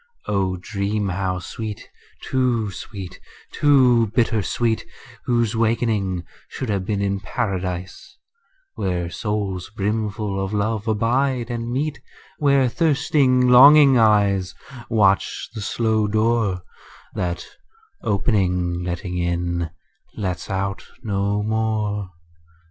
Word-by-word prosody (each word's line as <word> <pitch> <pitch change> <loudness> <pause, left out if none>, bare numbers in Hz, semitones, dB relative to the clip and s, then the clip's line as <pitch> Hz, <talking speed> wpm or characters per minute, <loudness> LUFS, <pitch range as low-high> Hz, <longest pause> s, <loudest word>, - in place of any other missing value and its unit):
O 95 -2 0
dream 100 +2 -2
how 95 0 -1
sweet, 105 +4 -6 0.4
too 120 -5 0
sweet, 95 0 -8 0.3
too 130 -6 +4
bitter 115 -2 +2
sweet, 115 +2 0 0.4
Whose 120 -2 +1
wakening 110 -5 0 0.3
should 130 - -5
have 100 -3 -1
been 100 -2 0
in 100 0 0
Paradise, 95 -5 -4 0.6
Where 90 -2 -2
souls 100 -4 -3
brimful 105 -1 -2
of 95 +2 -4
love 110 +1 -1
abide 120 +3 +1
and 120 0 -3
meet; 145 +4 -2 0.4
Where 140 -3 +4
thirsting 135 -3 +2
longing 135 +1 +8
eyes 100 -4 +3 0.3
Watch 100 -4 +2
the 110 - -6
slow 110 0 0
door 110 -3 +1 0.5
That 85 -1 -3 0.6
opening, 90 -5 0
letting 90 +1 -3
in, 85 -1 -1 0.5
lets 90 -4 -4
out 95 0 -2 0.2
no 100 -1 0
more. 105 -2 -1
105 Hz, 105 wpm, -22 LUFS, 95-115 Hz, 0.6 s, longing